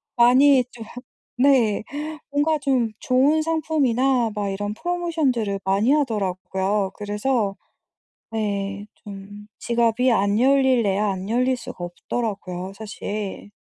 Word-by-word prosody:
많이 255 +3 +6
좀 230 - -9 0.5
네 250 -5 +3 0.5
뭔가 295 +2 +1
좀 260 -5 +1
좋은 275 +5 +3
상품이나 270 -6 +1
막 205 -1 -2
이런 205 +2 -3
프로모션들을 310 - -1
많이 200 +6 +2
하더라고요. 195 -6 0
그래서 210 0 -1 0.8
네 200 -2 -3 0.2
좀 205 0 -10
지갑이 235 +1 +2
안 205 -1 +2
열리려야 250 -6 +3
안 190 +1 -6
열릴 255 +2 +2
수가 230 -6 -9
없더라고요 185 0 -4
사실. 205 -1 -6
225 Hz, 235 characters per minute, -23 LUFS, 200-265 Hz, 0.8 s, 많이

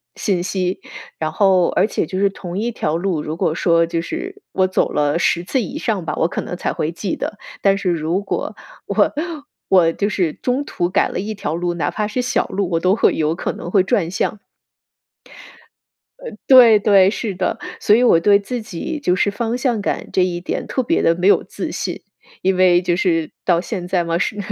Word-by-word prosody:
信 185 -5 -1
息， 185 -1 -2 0.4
然 155 -1 -2
后 190 -3 +3
而 195 - +2
且 - - -1
就 185 +4 -4
是 200 0 +3
同 185 -1 -6
一 235 +2 -1
条 160 -7 -1
路， 175 -3 -1
如 155 +2 -5
果 160 - 0
说 165 -1 +3
就 165 0 -2
是 385 - -6
我 185 0 +2
走 185 - 0
了 145 +1 +1
10 170 0 +1
次 260 +7 0
以 260 - -5
上 220 - -2
吧， 155 - -2
我 160 - +2
可 - - -4
能 180 - -6
才 - - -2
会 155 - -2
记 180 +2 -3
得。 205 - -5 0.2
但 195 -1 +3
是 195 -2 -1
如 170 +3 0
果 - - -4 0.3
我 - - +1 0.6
我 175 -3 +5
就 205 +1 -1
是 175 -7 0
中 260 +3 -2
途 175 - -2
改 - - +2
了 - - -4
一 210 +3 -3
条 195 -6 -3
路， 175 +1 -1
哪 170 - -1
怕 210 - -2
是 250 +4 -2
小 245 - 0
路， 195 -2 -2
我 165 - +1
都 185 +2 +3
会 - - +3
有 155 0 0
可 - - -3
能 175 - -7
会 195 - +5
转 180 -2 0
向。 205 +2 -2 1.8
呃， - - -8 0.2
对 245 -5 +8
对， 195 -2 +5
是 215 -1 -3
的， - - -1 0.2
所 210 - +4
以 240 - +3
我 230 -9 +5
对 200 +4 +4
自 240 +4 -5
己 220 - -5
就 180 -10 +1
是 200 +2 +1
方 235 +2 -2
向 240 -4 0
感 - - -3
这 185 - +2
一 175 -1 -1
点 180 - -4
特 260 - -1
别 - - +1
地 165 - +3
没 180 +2 0
有 205 - +5
自 - - -6
信。 - - -4 0.4
因 190 0 +2
为 180 -1 +4
就 175 -1 0
是 165 -3 0
到 175 -2 +3
现 180 -1 -5
在 180 -2 +1
嘛， 165 0 0
是 210 +4 -2
185 Hz, 230 characters per minute, -19 LUFS, 175-210 Hz, 1.8 s, 对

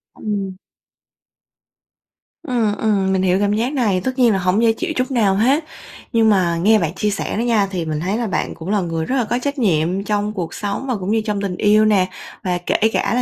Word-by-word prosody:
Ừm. 200 -3 -4 1.9
Ừm, 230 -6 0
ừm, 195 -3 +1
mình 190 - +1
hiểu 185 0 +2
cảm 205 0 +1
giác 240 +6 -1
này, 210 -9 +1
tất 260 0 -3
nhiên 240 -3 +5
là 195 - +1
hổng 185 +4 +1
dễ 225 -1 +4
chịu 345 +7 -3
chút 255 +2 -1
nào 205 -6 +2
hết, 265 +9 +2 0.5
nhưng 225 -1 +4
mà 180 -4 +2
nghe 215 +2 +5
bạn 165 -1 -1
chia 210 +2 -1
sẻ 205 +1 -3
đó - - 0
nha, 225 -5 +2
thì 175 -4 -3
mình 155 -1 -2
thấy 190 +6 -1
là 235 - -2
bạn 190 - -2
cũng 165 +3 -8
là 210 0 +2
người 165 -2 -2
rất 260 - -1
là 250 - +2
có 240 +3 -1
trách 285 0 -2
nhiệm 185 -2 +1
trong 210 0 -1
cuộc 175 -5 -4
sống 205 +6 -4
và 250 - 0
cũng 195 0 -3
như 225 - +2
trong 210 -2 -2
tình 190 -3 -3
yêu 215 +1 +4
nè, 195 -4 +3 0.4
và 180 -1 0
kể - - 0 0.2
cả - - 0
là 250 - +2
205 Hz, 235 wpm, -19 LUFS, 185-230 Hz, 1.9 s, nhiên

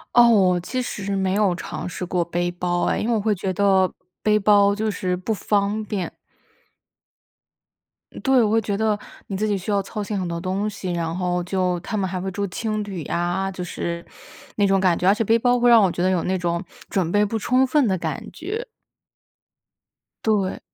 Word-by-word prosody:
哦， 240 0 +8
我 185 -5 +4
其 255 +9 -3
实 200 -4 -3
没 190 -1 0
有 200 -4 +2
尝 175 - -6
试 180 - -5
过 175 0 0
背 175 +1 -1
包 175 0 -1
哎， - - +1
因 - - -2
为 235 - +2
我 - - +1
会 210 +1 +1
觉 190 -1 -3
得 190 -1 +3 0.3
背 210 0 +3
包 200 -1 +4
就 215 +1 -1
是 180 -2 -1
不 185 +5 -2
方 205 +1 0
便。 195 -3 -3 2.1
对， 265 -3 +4
我 210 - +2
会 225 - +4
觉 200 -1 -2
得 215 -1 +1 0.3
你 195 - -3
自 215 - 0
己 205 -1 +1
需 195 +3 -4
要 200 -1 +2
操 205 +2 -5
心 200 0 -3
很 185 - -2
多 170 0 -3
东 190 +4 -1
西， 195 -3 -5
然 170 -1 -2
后 180 -1 0
就 180 -1 0
他 195 +5 -5
们 195 -2 0
还 185 - -3
会 190 +1 -3
住 200 +2 -2
青 215 +3 -2
旅 195 -4 -6
呀。 175 +4 -1
就 185 -1 -6
是 170 -1 -4 0.5
那 205 -1 +3
种 195 -1 +3
感 180 -3 +3
觉， 180 - +1
而 200 - +6
且 225 - 0
背 225 +2 +3
包 245 +1 +3
会 245 0 +4
让 230 -2 +8
我 195 - +4
觉 175 0 -2
得 185 - +3
有 180 -3 +1
那 185 0 0
种 170 -1 -1 0.3
准 180 -4 0
备 205 +3 +3
不 220 +2 -1
充 255 +4 +3
分 265 -1 +2
的 190 - +1
感 160 -4 -3
觉。 430 +9 -5 1.6
对。 205 -4 +1
195 Hz, 230 characters per minute, -23 LUFS, 180-215 Hz, 2.1 s, 哦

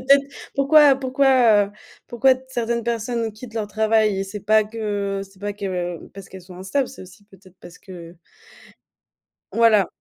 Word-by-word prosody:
C'est - - -13
peut-être 275 0 +5 0.3
pourquoi 285 0 +5
pourquoi, 260 -5 +3
heu, - - -17 0.4
pourquoi 250 +2 +3
t 255 - -13
certaines 235 -2 -2
personnes 230 -1 -2
quittent 225 +2 -12
leur 220 -2 -2
travail? 215 -2 +1
C'est 205 +2 -7
pas 215 +1 +4
que 205 -2 -3
c'est 195 -1 -21
pas 205 0 -3
que 180 -4 -5
parce 195 -1 -12
qu'elles 190 -1 -12
sont 180 0 -13
instables, 195 +9 -2
c'est 265 - -12
aussi 185 +3 -16
peut-être 190 -1 -19
parce 175 - -14
que 175 -2 -12 1.4
Voilà, 225 -4 +4
215 Hz, 170 wpm, -21 LUFS, 195-240 Hz, 1.4 s, peut-être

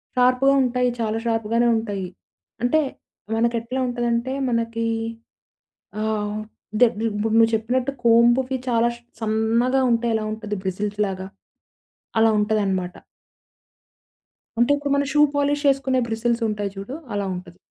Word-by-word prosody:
షార్ప్‌గా 250 +2 +4
ఉంటాయి. 250 0 +1
చాలా 220 -1 -1
షార్ప్‌గానే 230 +1 +1
ఉంటాయి. 205 -4 -3 0.6
అంటే 245 +6 +3 0.6
మనకెట్లా 235 +2 0
ఉంటందంటే 240 +1 -1 0.2
మనకి 230 -1 -1 1.2
ఆహ్, 215 -1 -1 0.4
దే 245 - +8 0.2
ఇప్పుడు 215 +1 -2
నువ్వు 225 0 +5
చెప్పినట్టు 245 +4 -1
కోంబ్‌కి 240 +3 +4
చాలా 235 0 +3 0.3
సన్నగా 225 +4 +1
ఉంటే 230 0 +1
ఎలా 220 -1 -1
ఉంటది 210 -2 -5
బ్రిజిల్స్‌లాగా 195 0 -2 0.9
అలా 225 0 +5
ఉంటదనమాట. 200 -4 0 1.7
అంటే 240 +4 +4
ఇప్పుడు 285 0 -3
మనం 280 -1 +1
షూ 295 - +4
పాలిష్ 285 +1 +1
ఏసుకునే 265 -1 0
బ్రిసిల్స్ 230 +1 -1
ఉంటాయి 205 -2 -3
చూడు, 200 +8 -6 0.2
అలా 205 -1 -1
ఉంటది. 180 0 -10
230 Hz, 115 wpm, -23 LUFS, 210-250 Hz, 1.7 s, దే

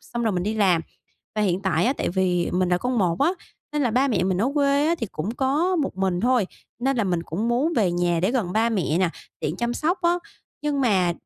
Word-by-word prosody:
xong 240 0 -5
rồi 220 -3 +1
mình 180 - -1
đi 210 +4 -1
làm. 190 -6 +3 0.6
Và 215 - +2
hiện 185 -2 +1
tại 175 -4 +1
á 260 - +3
tại - - -2
vì 180 -1 0
mình 180 0 +1
là 180 0 +2
con 250 +3 -1
một 175 -4 +1
á, 295 - +4 0.4
nên 295 -1 0
là 245 - +1
ba 260 +5 +2
mẹ 215 -8 +1
mình 185 -1 0
ở 235 +7 +1
quê 285 0 +3
á 335 - +3
thì 230 - -2
cũng 170 +7 -3
có 295 +9 +1
một 285 - -1
mình 190 -2 0
thôi, 240 -3 +2 0.3
nên 270 +2 0
là 225 - +1
mình 175 -3 0
cũng 200 +8 -3
muốn 260 +8 +1
về 195 -6 +2
nhà 175 -1 +1
để 190 +5 +2
gần 225 -9 -1
ba 225 +3 +2
mẹ 185 -7 0
nè, 185 -3 +2 0.3
tiện - - -2
chăm 240 0 -1
sóc 340 +7 0
á. 345 +1 +3 0.4
Nhưng 295 -2 0
mà 190 -8 +3
220 Hz, 255 wpm, -24 LUFS, 180-265 Hz, 0.6 s, á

